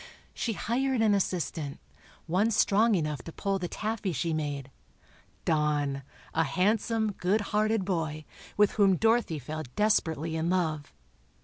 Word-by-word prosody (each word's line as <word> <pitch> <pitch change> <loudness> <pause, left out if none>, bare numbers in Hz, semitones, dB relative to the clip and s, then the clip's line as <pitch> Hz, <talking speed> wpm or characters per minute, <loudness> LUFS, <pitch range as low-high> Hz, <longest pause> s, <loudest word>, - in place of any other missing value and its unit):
She 230 - -2
hired 250 +3 0
an 215 -2 +4
assistant—one 180 +2 -2
strong 215 0 +3
enough 150 -6 -1
to 165 - -9
pull 195 +3 -1
the 175 - -2
taffy 215 0 -2
she 160 +4 -1
made—Don, 145 0 -3 0.3
a 165 - +3
handsome, 215 +6 +1
good 200 +2 0
hearted 215 -1 +2
boy, 160 -5 -2 0.3
with 210 -1 +5
whom 195 -3 +4
Dorothy 225 -6 +2
fell 155 +3 -5
desperately 165 -7 +1
in 160 +1 0
love. 160 -5 -1
180 Hz, 125 wpm, -29 LUFS, 155-215 Hz, 0.3 s, with